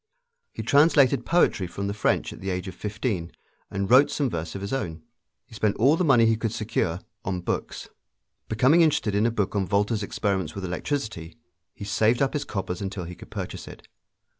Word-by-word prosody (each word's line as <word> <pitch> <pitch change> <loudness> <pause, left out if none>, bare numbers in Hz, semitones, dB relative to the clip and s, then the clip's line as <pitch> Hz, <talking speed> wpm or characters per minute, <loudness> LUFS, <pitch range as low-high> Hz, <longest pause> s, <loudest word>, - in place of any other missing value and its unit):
He - - -6
translated 140 -4 +4
poetry 165 - +2
from 100 +3 -5
the 100 - -2
French 105 - 0
at - - -12
the 95 - -3
age 90 0 -3
of 95 - -6
fifteen, 100 -4 -3 0.4
and 100 0 -2
wrote 135 +6 +6
some 140 -3 -1
verse 85 +1 -4
of 100 - -5
his 100 +5 -4
own. 85 -12 -3 0.4
He 120 - -19
spent 105 -1 0
all 135 +7 +4
the 180 - 0
money 130 -8 +5
he 115 0 +3
could 115 -1 -2
secure 95 -6 -2 0.2
on 90 -1 -2
books. - - -4 0.6
Becoming 130 +10 +4
interested 140 -10 +2
in 105 +3 +3
a - - +2
book 105 -3 -2
on 95 -2 0
Volta's 105 +4 +1
experiments 95 -5 -2
with 100 -1 -4
electricity, 90 - -4 0.4
he 100 - -7
saved 110 +3 +2
up 135 -1 +1
his 150 - -2
coppers 95 -3 -4
until 95 -2 -4
he 85 +1 -7
could - - -13
purchase - - -6
it. - - -12
105 Hz, 200 wpm, -25 LUFS, 95-125 Hz, 0.6 s, wrote